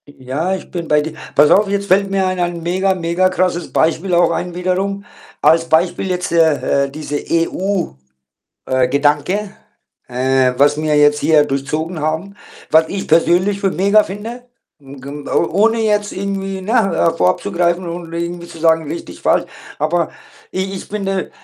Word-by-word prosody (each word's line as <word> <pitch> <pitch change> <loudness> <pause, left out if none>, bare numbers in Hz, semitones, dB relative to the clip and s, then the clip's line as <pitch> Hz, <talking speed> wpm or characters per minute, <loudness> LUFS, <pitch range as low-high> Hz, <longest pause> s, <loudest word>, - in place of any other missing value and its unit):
Ja, 145 +7 -3
ich 190 - -10
bin 170 -2 -4
bei 150 0 +3
dir. 155 +1 -5 0.2
Pass 150 +1 +5
auf, 205 +1 +5
jetzt 200 0 -1
fällt 195 +1 +3
mir 195 -1 +1
ein 185 0 -1
ein 175 -1 -2
mega, 190 +3 +1
mega 175 +1 +1
krasses 180 -2 -1
Beispiel 165 +3 +1
auch 170 -1 +4
ein 175 +1 -3
wiederum. 190 +3 -2 0.4
Als 165 0 +4
Beispiel 170 +3 +1
jetzt, 180 0 -2
äh, 160 -4 +2
äh, - - -7
diese 145 0 -4
EU 180 +3 0 0.8
äh, 130 -1 +1
Gedanke, 150 +9 0 0.5
äh, 130 +1 +1
was 145 +1 +4
mir 155 -1 0
jetzt 150 0 +4
hier 155 -2 +4
durchzogen 150 +4 -3
haben, 160 +6 -2 0.4
was 160 +1 +5
ich 195 -1 -5
persönlich 175 +5 +3
für 195 -2 +1
mega 200 +4 +3
finde, 220 +5 -7 0.4
hm, 135 -1 -12
g 135 - -10
m 145 0 -7
o - - +1 0.2
ohne 225 0 +2
jetzt 210 -1 0
irgendwie, 195 0 -4
ne, 195 +4 -4 0.4
äh, - - -10
vorab 90 - +2
zu - - -5
greifen 175 +1 0
und 170 -1 -7
irgendwie 170 +1 -4
zu 165 - -11
sagen: 160 -1 +2
„Richtig, 165 +4 -7
falsch.“ - - +2 0.3
Aber 160 +3 0 0.4
ich 190 +1 -3
ich 190 - -6
finde 195 -2 -3
170 Hz, 175 wpm, -17 LUFS, 155-190 Hz, 0.8 s, Pass